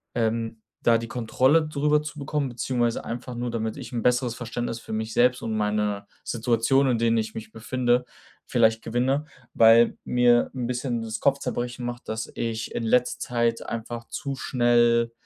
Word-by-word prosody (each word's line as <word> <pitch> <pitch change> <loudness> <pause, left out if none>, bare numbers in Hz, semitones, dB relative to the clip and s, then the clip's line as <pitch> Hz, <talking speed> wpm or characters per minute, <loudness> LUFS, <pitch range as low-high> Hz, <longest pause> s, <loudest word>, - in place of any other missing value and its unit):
ähm, 115 0 -1 0.3
da 115 -1 +5
die 115 0 -5
Kontrolle 130 +6 +2
drüber 150 0 +2
zu 150 0 -7
bekommen 140 -1 -2
beziehungsweise 120 -1 -1
einfach 120 +1 -5
nur, 120 0 -3
damit 110 -1 -3
ich - - -8
'n 120 - -1
besseres 125 -1 +2
Verständnis 115 0 -4
für - - -8
mich 110 0 -3
selbst 125 +1 +3
und 110 - -2
meine 105 -1 -1 0.2
Situationen, 120 +3 +2
in - - +1
denen 115 0 +2
ich 110 0 -4
mich 110 0 -7
befinde, 120 +2 0 0.4
vielleicht 115 -2 +3
gewinne. 130 +5 0 0.3
Weil 115 +1 +6
mir 120 -1 +3
'n 125 -2 -2
bisschen 125 -1 -2
das 110 -1 -4
Kopfzerbrechen 125 -3 -1
macht, 120 0 -6
dass 110 0 -4
ich 115 -1 -3
in - - -1
letzter 125 +2 +2
Zeit 120 -1 -1
einfach 115 +1 -5
zu 140 -2 -4
schnell, 120 -2 +2
120 Hz, 170 wpm, -25 LUFS, 115-125 Hz, 0.4 s, Weil